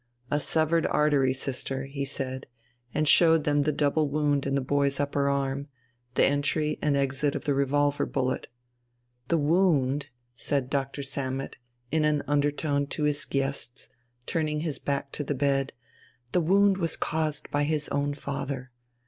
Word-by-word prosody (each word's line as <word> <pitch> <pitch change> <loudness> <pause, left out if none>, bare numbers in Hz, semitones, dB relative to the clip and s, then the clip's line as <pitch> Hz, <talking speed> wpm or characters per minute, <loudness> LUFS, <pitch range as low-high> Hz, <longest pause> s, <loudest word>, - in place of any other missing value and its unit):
"A 145 - +2
severed 160 +2 +2
artery, 145 -3 +3
sister," 135 0 -3
he 140 0 -4
said, 130 -1 -4 0.4
and 155 +3 0
showed 165 +1 +6
them 145 -1 +2
the 150 +2 +1
double 150 +1 +1
wound 145 -1 +1
in 135 - 0
the - - +2
boy's 140 +1 +1
upper 140 0 +1
arm, 140 0 -1 0.5
the - - +5
entry 145 +2 0
and 145 -2 +2
exit 140 +1 0
of - - -4
the 145 - +2
revolver 145 +1 +1
bullet. 130 -1 -1 0.8
"The 170 - +2
wound," 145 -4 +2 0.3
said 135 0 -2
Doctor 140 0 -2
Sammet 135 -1 -4 0.4
in 155 0 +2
an 150 -1 +2
undertone 145 0 +1
to 150 - -3
his 150 -1 0
guests, 135 -2 -3 0.4
turning 155 -1 -1
his 155 -5 -2
back 140 -1 -2
to 150 - -3
the 145 0 -2
bed, 135 0 +1 0.6
"the 180 - +2
wound 195 +3 +4
was 165 -4 -1
caused 155 -1 -2
by 145 - +1
his 150 0 0
own 145 0 -1
father. 140 -2 -5
145 Hz, 155 wpm, -27 LUFS, 135-150 Hz, 0.8 s, showed